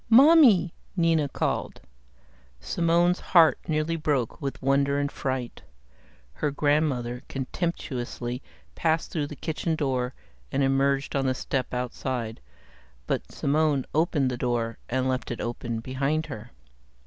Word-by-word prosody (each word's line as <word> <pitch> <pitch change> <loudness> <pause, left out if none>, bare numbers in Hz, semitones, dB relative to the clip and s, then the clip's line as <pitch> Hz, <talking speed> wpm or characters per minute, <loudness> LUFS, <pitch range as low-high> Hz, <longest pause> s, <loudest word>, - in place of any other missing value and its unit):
"Mommy," 235 - +7 0.2
Nina 165 -4 +3
called. - - -2 0.8
Simone's 170 - +2
heart 165 -3 +5
nearly 155 +1 0
broke 145 -7 -1
with 135 -1 -3
wonder 140 +1 +2
and 145 0 -1
fright. 130 -2 -3 0.7
Her 145 - -1
grandmother 140 -4 0
contemptuously 130 -4 -3 0.3
passed 160 -1 0
through 150 -3 -1
the 150 - -8
kitchen 160 +2 -2
door 130 -4 -1 0.4
and 140 - +1
emerged 135 +1 +1
on 135 -1 +1
the 130 - +1
step 130 0 -2
outside, 125 - -3 0.6
but - - -2
Simone 145 -2 +1
opened 150 -4 +2
the 125 - -3
door 120 -2 -1
and 130 +1 0
left 130 -1 -1
it 120 - -4
open 120 -1 -3
behind 135 +5 -1
her. 115 -5 -8
140 Hz, 125 wpm, -26 LUFS, 125-160 Hz, 0.8 s, Mommy